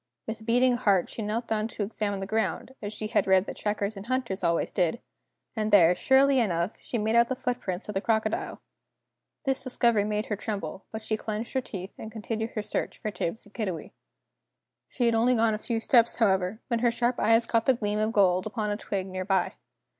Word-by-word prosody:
With 220 0 -6
beating 245 +1 +4
heart 200 -7 +2
she - - -5
knelt 220 +3 -2
down 215 0 0
to 220 - -4
examine 205 -1 -2
the - - -2
ground, 220 +5 -2
as 205 - -4
she 215 0 -5
had 220 - +1
read 190 0 +4
that - - -6
trackers 210 0 -2
and 195 +2 -9
hunters 240 -7 -2
always 170 -1 +1
did, 180 +4 +1 0.6
and 215 -1 -1
there, 180 -5 +7
surely 265 +7 +4
enough, 180 -3 0
she 240 - -4
made 220 0 0
out 235 0 +5
the 260 - 0
footprints 245 -7 -3
of 210 - -4
the 195 - -1
crocodile! 220 -1 -1 0.8
This 270 -1 0
discovery 235 -4 +2
made 210 +1 -1
her 210 - -2
tremble, 195 -4 -5
but 220 0 -6
she 215 0 -1
clenched 215 +1 -4
her 260 - +1
teeth 190 -5 -7
and 220 - -7
continued 220 0 -3
her 215 - -2
search 215 - -3
for 215 - -4
Tibbs 205 +1 -4
and 205 - -19
Kiddiwee. 190 -8 -4 1.0
She 245 - -1
had 235 - +3
only 235 +3 +3
gone 225 -1 +3
a 215 - -3
few 230 0 -2
steps, 235 0 +4
however, 190 -1 +1
when 235 -3 0
her 240 +1 +3
sharp 240 +1 0
eyes 225 +1 +4
caught 230 -1 +1
the 265 - +5
gleam 210 -2 -1
of 215 +1 +1
gold 185 -3 +3
upon 210 0 -2
a 205 - -1
twig 195 -3 -3
near 185 -1 -4
by. 190 -2 +1
215 Hz, 215 wpm, -27 LUFS, 200-235 Hz, 1.0 s, there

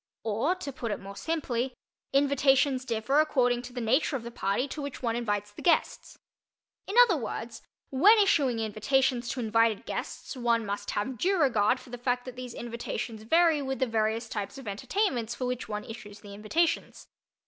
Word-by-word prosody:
Or, 230 - 0
to 295 -7 -6
put 240 -2 -4
it - - -2
more 200 0 -9
simply, 260 -5 -2 0.4
invitations 275 -1 +3
differ 240 +4 +1
according 245 -5 +2
to 245 0 -9
the 250 - -4
nature 255 +6 +1
of 245 - -4
the 235 - -7
party 200 +4 -1
to 300 - -5
which 280 -2 -6
one 230 -1 0
invites 205 -3 -2
the - - -11
guests. 345 - +1 0.7
In 400 - -4
other 420 -8 +2
words, 230 -2 -5 0.3
when 390 +12 +6
issuing 290 - +3
invitations 240 +3 +1
to 265 - -3
invited 225 -2 +2
guests - - -5
one 235 -3 +1
must 205 0 -4
have 240 +3 -2
due 380 0 +2
regard 245 -4 +3
for 255 -1 -15
the 245 - -6
fact 245 0 -1
that 255 -1 -8
these 250 -1 -7
invitations 235 -1 -5
vary 325 +5 +3
with 265 -1 -3
the 260 - +1
various 225 0 0
types 210 +3 -5
of 270 -5 -10
entertainments 235 - -1
for 255 - -3
which 250 -1 -3
one 210 0 -3
issues 215 -2 -10
the 205 -2 -11
invitations. 315 +12 -1
245 Hz, 185 wpm, -28 LUFS, 225-275 Hz, 0.7 s, when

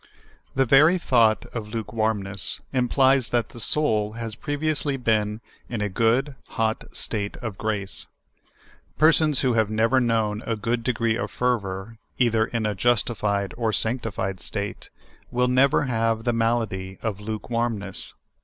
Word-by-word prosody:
THE 135 0 +3
very 150 +8 +6
thought 115 -9 +3
of 110 -3 -4
lukewarmiiess 105 -3 -2
implies 130 0 +3
that 120 -2 0
the 120 - -11
soul 110 -5 +2
has 115 -1 -5
previously 145 +2 -1
been 110 -3 0 0.3
iu 120 - -3
a 105 0 -1
good, 115 +8 +1 0.2
hot 110 0 0
state 100 -2 -2
of 115 -5 -6
grace. 105 -3 -3 0.9
Persons 155 -2 +4
who 130 -2 +2
have 110 -2 +2
never 115 +4 +3
known 110 -3 +1
a 115 - 0
good 115 +3 -1
de 125 - +2
gree 115 0 0
of - - -3
fervor, 110 -3 -2 0.2
either 115 -3 +3
in 115 -3 -2
a 105 - 0
justified 105 -2 0
or 115 -2 0
sanctified 110 -5 -2
state, 100 +3 -4 0.4
will 125 +1 +1
never 130 +3 +4
have 115 -3 0
the 120 - +1
malady 115 -5 -1
of 105 -3 -2
lukewarmness. 110 -1 -3
115 Hz, 145 wpm, -24 LUFS, 105-125 Hz, 0.9 s, very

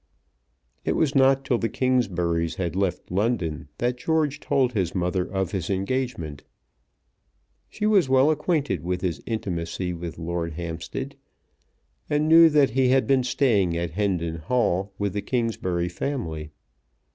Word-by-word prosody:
It - - 0
was 150 -4 +1
not 135 -1 +4
till 120 - +1
the 115 - -1
Kingsburys 90 -11 0
had 90 -2 -3
left 95 -3 -2
London 90 - -1
that 120 +1 -1
George 150 -1 0
told 130 -4 +1
his 95 -5 -1
mother 90 0 0
of 95 -3 -1
his 95 -3 -3
engagement. 100 - -2 1.3
She 210 - -3
was 200 -10 +4
well 135 +3 +5
acquainted 150 - 0
with 90 +1 -2
his 85 -6 -2
intimacy 90 -5 -3
with 85 -1 -6
Lord 85 0 -3
Hampstead, 85 - -5 0.9
and 150 +1 +1
knew 165 +1 +8
that 145 -5 +4
he 130 +2 +2
had 130 +1 +3
been 135 -2 +3
staying 110 -9 +2
at 85 -1 -2
Hendon 85 -4 -1
Hall 95 +1 0
with 100 -2 -1
the 100 - -2
Kingsbury 100 -7 -1
family. 85 - -4
100 Hz, 145 wpm, -25 LUFS, 85-130 Hz, 1.3 s, knew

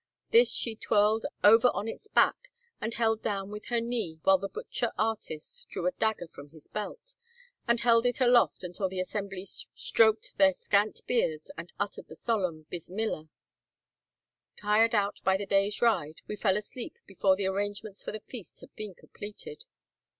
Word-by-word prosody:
This 470 +2 +6
she 230 -2 -1
twirled 215 0 +2 0.2
over 225 +4 +8
on 210 - -2
its 425 - -6
back, - - +3 0.3
and 220 - -2
held 225 -1 +1
down 200 -2 -2
with 210 0 -7
her 240 -1 +1
knee 230 -9 -2
while 190 -1 +5
the 195 +1 -4
butcher 455 - -3
artist 220 - -3
drew - - -4
a 275 - +3
dagger 220 -8 -1
from 145 -2 -12
his 155 0 -15
belt, 210 - -6 0.5
and 235 0 +3
held 235 0 +4
it 245 - -1
aloft 245 -5 +4
until 180 +2 -2
the 185 0 -4
assembly 195 0 -3
stroked 225 - +1
their 190 -2 +6
scant 205 +1 +1
beards, 155 -11 0
and 170 +1 -8
uttered 205 0 -3
the - - -11
solemn 185 -9 -1
bismillah. 175 -2 -3 1.3
Tired 220 +3 +3
out 200 -1 +1
by 190 0 +3
the 200 - -4
day's 200 +3 +2
ride, 160 -10 +1
we 210 - -4
fell 195 -1 +2
asleep 220 +3 -6
before 190 0 +2
the 195 0 -2
arrangements 205 +1 -3
for - - -4
the 215 - -6
feast 220 -8 -10
had - - -15
been 210 -4 -6
completed. 445 - -9
210 Hz, 170 wpm, -29 LUFS, 190-230 Hz, 1.3 s, over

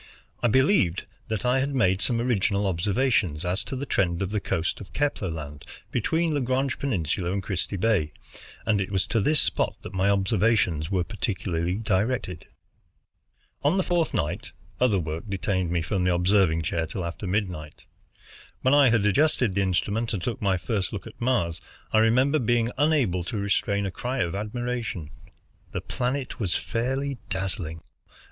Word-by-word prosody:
I 120 - +3
believed 130 - +3 0.2
that 110 0 -2
I 125 +2 +3
had 140 +1 -1
made 95 -6 +3
some 120 -2 +1
original 105 -4 +1
observations 95 - +1
as 90 +3 0
to - - -4
the 135 +2 -3
trend 90 -6 +1
of 95 - -3
the 105 - 0
coast 85 -1 -2
of 100 - -11
Kepler 145 -10 0
Land 75 -3 -6 0.3
between 160 +7 +1
Lagrange 130 -1 0
Peninsula 90 - -1
and 100 0 -2
Christie 100 +1 -2
Bay, 95 -7 +2 0.5
and 105 -2 +2
it 95 - -2
was 95 -2 +1
to 115 - +1
this 150 +8 +3
spot - - +1
that - - -8
my 95 +1 +2
observations 100 -5 +2
were 95 -3 +1
particularly 90 -4 -2
directed. 105 -4 -1 1.2
On 150 +7 +3
the 190 - +2
fourth 175 -2 +1
night 75 0 -2 0.3
other 125 -5 +3
work 80 0 -3
detained 95 -2 -1
me 85 -1 0
from 95 +2 -1
the 90 -1 +3
observing 90 -2 +3
chair 80 +1 -1
till 90 +2 -4
after 85 +4 -5
midnight. 90 -6 -3 0.8
When 130 - +4
I 145 -3 +7
had 115 -3 +3
adjusted 125 -1 +3
the 100 - +1
instrument 100 +5 0
and 90 - -4
took 120 +3 -3
my 95 -2 +2
first 100 0 -2
look 100 -5 -5
at - - -12
Mars, 85 -10 +1 0.3
I 110 - +6
remember 130 +7 +4
being 120 0 +2
unable 135 - +2
to 105 - -3
restrain 100 0 +1
a 95 - -2
cry 125 +6 -2
of 85 - -3
admiration. 110 -5 -3 0.6
The - - -2
planet 130 +2 -3
was 95 -5 0
fairly 135 +3 -2
dazzling. 90 -4 -3
100 Hz, 170 wpm, -26 LUFS, 90-125 Hz, 1.2 s, I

